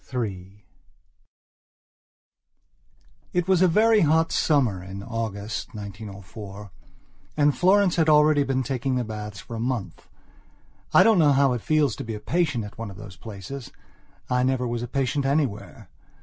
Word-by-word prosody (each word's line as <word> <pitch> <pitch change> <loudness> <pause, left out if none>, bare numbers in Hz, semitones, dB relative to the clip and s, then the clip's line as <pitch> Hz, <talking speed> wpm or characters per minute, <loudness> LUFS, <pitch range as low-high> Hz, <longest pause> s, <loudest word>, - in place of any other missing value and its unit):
III 100 -5 -5 2.7
IT 180 0 0
was 190 -2 +3
a 185 - +6
very 220 +5 +4
hot 160 +1 +3
summer, 125 - +1
in 95 +2 -8
August, 110 -2 -5
1904; 100 0 -9 0.7
and 145 -1 +3
Florence 190 0 +3
had 160 -1 +3
already 150 -1 +5
been 135 -2 0
taking 130 0 -2
the 125 - 0
baths 105 -2 -7
for 115 - -8
a - - -5
month. 115 -7 -4 0.8
I - - +7
don't 220 -5 +4
know 150 -3 +5
how 135 -1 +3
it 120 - -3
feels 150 -4 +1
to - - -5
be 115 -1 -5
a - - -6
patient 145 -5 0
at 105 +2 -10
one 115 -2 -5
of 95 - -11
those 100 -3 -10
places. 110 +6 -8 0.6
I 125 0 +1
never 130 -1 0
was 120 0 -3
a 120 - -4
patient 135 +2 -1
anywhere. 135 -6 -2
125 Hz, 155 wpm, -25 LUFS, 105-150 Hz, 2.7 s, I